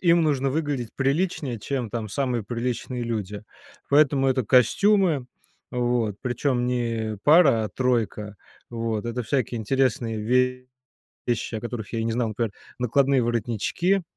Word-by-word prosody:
им 170 -1 +4
нужно 140 -3 +1
выглядеть 140 -5 -2
приличнее, 140 -2 0
чем 125 0 -3
там 115 -2 -4
самые 125 -1 -1
приличные 120 +2 -3
люди. 105 -3 -4 0.5
Поэтому 140 -2 +4
это 130 -1 +1
костюмы, 160 - +3 0.5
вот, 120 -4 0
причём 125 0 0
не 115 -4 -2
пара, 145 -8 +6
а 105 - -3
тройка. 115 -5 -1 0.3
Вот. 115 -2 -2
Это 120 +1 -2
всякие 125 -1 -1
интересные 120 -1 0 1.1
вещи, 120 -1 -1
о 110 - -2
которых 120 -3 -6
я 115 - -1
и - - -1
не 115 - 0
знал, 115 -2 -1
как: 115 -1 -1 0.3
накладные 135 +2 +2
воротнички, 120 - 0
125 Hz, 135 wpm, -25 LUFS, 115-135 Hz, 1.1 s, пара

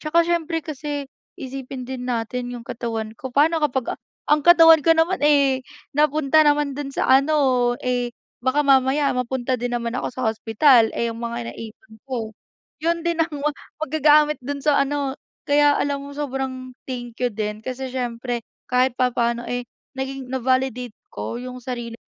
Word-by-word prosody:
Tsaka 335 +2 +2
siyempre 330 -1 -1
kasi 290 -2 -4 0.3
isipin 265 -1 -7
din 255 0 -6
natin 245 +1 -2
yung 235 -1 -8
katawan 225 -2 -4
ko, 260 - -6
paano 315 +4 +3
kapag 265 -4 -1 0.3
ang 300 0 +5
katawan 330 -2 +8
ko 330 - +6
naman, 340 +3 +2
eh, 280 -3 +4 0.3
napunta 300 +1 +3
naman 295 -1 +3
dun 285 0 -5
sa - - -1
ano, 265 -3 +3
eh, 245 -1 -1 0.3
baka 260 +4 +2
mamaya 275 +1 +3
mapunta 250 0 -2
din 245 0 -2
naman 235 0 -3
ako 255 - -2
sa 255 - -4
hospital. 225 +2 +4
Eh, 235 0 0
yung 225 - -9
mga 235 0 -4
naipon 220 0 -11
ko, 230 -4 -3 0.5
yun 335 +1 0
din 340 -1 0
ang 325 - +2 0.2
wa 300 - +3 0.3
maggagamit 300 0 +4
dun 280 +2 -5
sa 295 -2 +4
ano 275 -1 0 0.3
kaya 290 0 +4
alam 285 -1 -1
mo 285 - -9
sobrang 265 -2 -4 0.2
thank 240 -2 -6
you 250 - +2
din 210 -1 -4
kasi 255 +2 -5
siyempre 245 -1 -3 0.3
kahit 250 0 +3
papaano, 235 -2 0
eh, 245 0 -3 0.3
naging 265 -1 -5
na-validate 255 -2 0 0.2
ko 235 - -5
yung 250 +1 -7
sarili 240 -2 -5
ko - - -83
260 Hz, 165 wpm, -22 LUFS, 245-290 Hz, 0.5 s, katawan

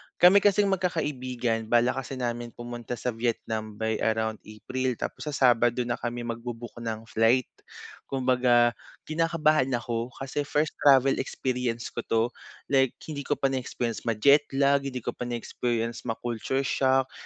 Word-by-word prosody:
Kami 185 +3 +7
kasing 200 0 +3
magkakaibigan 130 - -1
balak 120 +3 +3
kasi 135 +1 -7
namin 120 -1 -3
pumunta 120 0 -6
sa 125 +1 -2
Vietnam 110 -2 -3
by 110 0 -1
around 110 -1 0
April. 125 +4 -3
Tapos 150 - -5
sa 150 - -2
Sabado 120 -1 +3
na 120 0 -3
kami 120 0 -3
magbo-book 120 0 -6
ng 115 -1 -4
flight. 115 +3 +2 0.6
Kumbaga, 125 -2 +3 0.3
kinakabahan 155 -3 +2
ako 120 -1 -2
kasi 140 +1 -4
first 150 +1 +1
travel 135 -1 +5
experience 125 -2 -2
ko - - -5
'to, 115 0 +2 0.5
like 135 -2 +3
hindi 145 -3 -6
ko 145 - +2
pa 135 -1 0
na-experience 120 -3 -3
ma-jetlag, 140 +3 +3
hindi 125 -3 -5
ko - - -2
pa 125 - -6
na-experience 120 0 -3
ma 115 - -1
culture 120 +3 -2
shock. 130 0 +2
125 Hz, 145 wpm, -27 LUFS, 115-135 Hz, 0.6 s, Kami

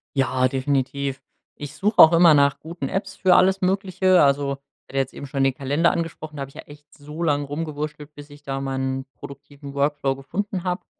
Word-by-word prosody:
Ja, 130 -1 +2
definitiv. 135 +1 -2 0.3
Ich 145 -1 -9
such 210 +2 -1
auch 160 - +9
immer 170 -1 +7
nach 140 -1 +3
guten 160 -4 -6
Apps 195 0 -3
für 185 -2 +3
alles 190 +1 +3
Mögliche. 185 -1 +2
Also, 140 0 +2 0.4
hatte 135 - -7
jetzt 135 -1 -1
eben - - -8
schon 135 0 -1
den 135 -1 +2
Kalender 145 +6 +1
angesprochen, 155 -2 -5
da - - -5
hab 135 - -4
ich - - -22
ja - - -8
echt 145 0 -17
so 150 +3 -8
lang 145 -3 +1
rumgewurschtelt, 150 0 -6
bis 145 0 -12
ich 145 0 -15
da 135 0 -4
mal 135 -1 -3
'n 130 0 -3
produktiven 140 0 -11
Workflow 140 -1 0
gefunden 180 +7 -4
hab. 180 0 -3
145 Hz, 200 wpm, -23 LUFS, 135-170 Hz, 0.4 s, auch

